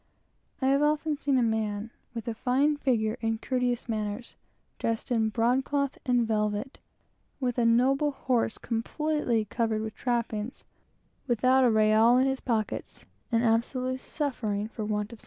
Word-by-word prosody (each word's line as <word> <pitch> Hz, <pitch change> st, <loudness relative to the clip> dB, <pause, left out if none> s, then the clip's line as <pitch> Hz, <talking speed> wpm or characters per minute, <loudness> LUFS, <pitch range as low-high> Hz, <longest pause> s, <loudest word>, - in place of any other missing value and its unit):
I -, -, +3 dB
have 275 Hz, +1 st, +3 dB
often 300 Hz, +1 st, +1 dB
seen 280 Hz, -2 st, 0 dB
a 250 Hz, -, +3 dB
man 220 Hz, -1 st, -1 dB, 0.2 s
with 230 Hz, -1 st, -5 dB
a 230 Hz, -, -1 dB
fine 265 Hz, +6 st, +2 dB
figure, 235 Hz, -5 st, 0 dB
and 225 Hz, -1 st, -1 dB
courteous 250 Hz, -2 st, -1 dB
manners, 215 Hz, +1 st, -3 dB, 0.5 s
dressed 230 Hz, +3 st, -2 dB
in 220 Hz, -2 st, +2 dB
broadcloth 260 Hz, +5 st, 0 dB
and 245 Hz, -2 st, +3 dB
velvet, 210 Hz, +3 st, -1 dB, 0.6 s
with 250 Hz, -2 st, -1 dB
a 235 Hz, -, +3 dB
noble 265 Hz, +5 st, +3 dB
horse 250 Hz, -5 st, 0 dB
completely 240 Hz, 0 st, -1 dB
covered 220 Hz, 0 st, -1 dB
with 220 Hz, -1 st, -5 dB
trappings; 235 Hz, -2 st, -2 dB, 0.6 s
without 255 Hz, +2 st, +3 dB
a 250 Hz, -, +5 dB
real 220 Hz, +2 st, +5 dB
in 260 Hz, -, +4 dB
his 265 Hz, 0 st, 0 dB
pocket, 225 Hz, -4 st, -3 dB, 0.3 s
and 230 Hz, 0 st, +2 dB
absolutely 250 Hz, +3 st, +1 dB
suffering 220 Hz, -8 st, -3 dB
for 215 Hz, -1 st, -5 dB
something 210 Hz, -1 st, 0 dB
to 235 Hz, -, -9 dB
eat. -, -, -30 dB
235 Hz, 155 wpm, -28 LUFS, 220-260 Hz, 0.6 s, a